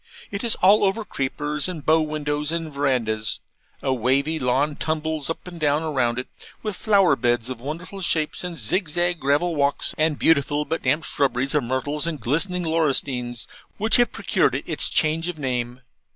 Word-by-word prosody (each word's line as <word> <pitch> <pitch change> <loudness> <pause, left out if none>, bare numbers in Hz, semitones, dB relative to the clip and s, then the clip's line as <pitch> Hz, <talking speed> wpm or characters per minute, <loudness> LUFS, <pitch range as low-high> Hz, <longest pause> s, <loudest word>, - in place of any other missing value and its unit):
It 200 +2 -4
is 235 - +2
all 205 +3 +6
over 205 +3 +1
creepers, 145 0 -1
and 165 -6 -6
bow 160 +1 +4
windows, 150 -1 -2
and 165 -2 -3
verandahs. 115 -6 0 0.4
A 130 - +1
wavy 135 +6 +1
lawn 135 +3 +1
tumbles 155 -1 -2
up 165 - -5
and 175 -2 -9
down 150 0 +1
all 155 -1 -3
round 120 -3 +1
it, 125 - -3 0.4
with 215 -3 -3
flower 195 -8 +4
beds 120 -1 0
of 120 -2 -7
wonderful 170 +8 -6
shapes, 155 -3 0
and 175 -2 -4
zigzag 175 - +1
gravel 150 +5 +1
walks, 140 -1 +1
and 155 -1 +2
beautiful 145 -1 +2
but 160 +3 -2
damp 145 +5 +1
shrubberies 135 -2 0
of 150 -5 +1
myrtles 145 +5 -1
and 160 -3 -3
glistening 165 - 0
laurustines, 135 -7 0 0.3
which 220 +2 +3
have 240 -1 +3
procured - - +1
it - - -3
its - - +2
change 160 +2 +1
of 180 -2 -4
name. 125 -2 -3
150 Hz, 180 wpm, -23 LUFS, 135-165 Hz, 0.4 s, all